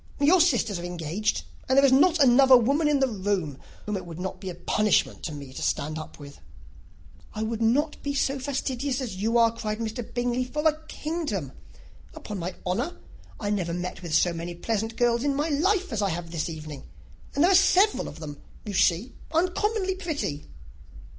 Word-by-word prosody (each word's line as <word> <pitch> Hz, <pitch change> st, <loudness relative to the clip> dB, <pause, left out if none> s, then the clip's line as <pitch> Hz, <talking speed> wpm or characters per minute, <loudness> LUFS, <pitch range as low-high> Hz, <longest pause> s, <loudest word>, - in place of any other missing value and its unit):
Your 325 Hz, +5 st, +5 dB
sisters 235 Hz, -, +2 dB
are -, -, -7 dB
engaged, 175 Hz, +4 st, -2 dB, 0.3 s
and 260 Hz, -, +3 dB
there 275 Hz, -, +7 dB
is 270 Hz, -, +5 dB
not 315 Hz, +6 st, +5 dB
another 265 Hz, -2 st, +7 dB
woman 280 Hz, +6 st, +2 dB
in 290 Hz, -2 st, +2 dB
the 270 Hz, -, +4 dB
room 190 Hz, -, -2 dB, 0.3 s
whom 210 Hz, -, -2 dB
it 185 Hz, -2 st, -5 dB
would 165 Hz, 0 st, -8 dB
not 190 Hz, +1 st, -5 dB
be 190 Hz, -, -5 dB
a 175 Hz, -, -6 dB
punishment 210 Hz, +4 st, +1 dB
to 165 Hz, -, -3 dB
me 140 Hz, -3 st, -9 dB
to -, -, -7 dB
stand 155 Hz, +2 st, -1 dB
up 155 Hz, -, -9 dB
with." 145 Hz, -1 st, -12 dB, 1.0 s
"I 215 Hz, -, -2 dB
would 225 Hz, 0 st, -3 dB
not 285 Hz, +7 st, +1 dB
be 285 Hz, 0 st, -3 dB
so 275 Hz, 0 st, 0 dB
fastidious 265 Hz, 0 st, -2 dB
as 235 Hz, -8 st, -5 dB
you 225 Hz, +4 st, +1 dB
are," 230 Hz, -1 st, +4 dB
cried 215 Hz, -2 st, -3 dB, 0.4 s
Bingley, 245 Hz, +1 st, 0 dB
"for 300 Hz, +5 st, 0 dB
a 310 Hz, 0 st, +1 dB
kingdom! 295 Hz, -, -3 dB, 0.6 s
Upon 205 Hz, -2 st, -6 dB
my 180 Hz, +2 st, -4 dB
honour, 230 Hz, -, -2 dB, 0.4 s
I 205 Hz, -1 st, -2 dB
never 175 Hz, -5 st, -1 dB
met 180 Hz, 0 st, -5 dB
with 170 Hz, -3 st, -2 dB
so 175 Hz, +2 st, +3 dB
many 170 Hz, +1 st, -5 dB
pleasant 225 Hz, +4 st, -2 dB
girls 240 Hz, 0 st, +2 dB
in 285 Hz, -1 st, +1 dB
my 295 Hz, +3 st, 0 dB
life 370 Hz, -, +1 dB
as 215 Hz, -, -1 dB
I 200 Hz, -, +1 dB
have 170 Hz, -1 st, -4 dB
this 165 Hz, -1 st, -2 dB
evening; 155 Hz, -3 st, -7 dB, 0.5 s
and 285 Hz, -, +3 dB
there 360 Hz, -, +5 dB
are -, -, +5 dB
several 390 Hz, +2 st, +4 dB
of 150 Hz, -, -9 dB
them, 145 Hz, -3 st, -8 dB, 0.2 s
you 205 Hz, -, -5 dB
see, 185 Hz, +6 st, +2 dB, 0.2 s
uncommonly 380 Hz, +4 st, +1 dB
pretty." 310 Hz, -, -4 dB
225 Hz, 195 wpm, -26 LUFS, 175-285 Hz, 1.0 s, there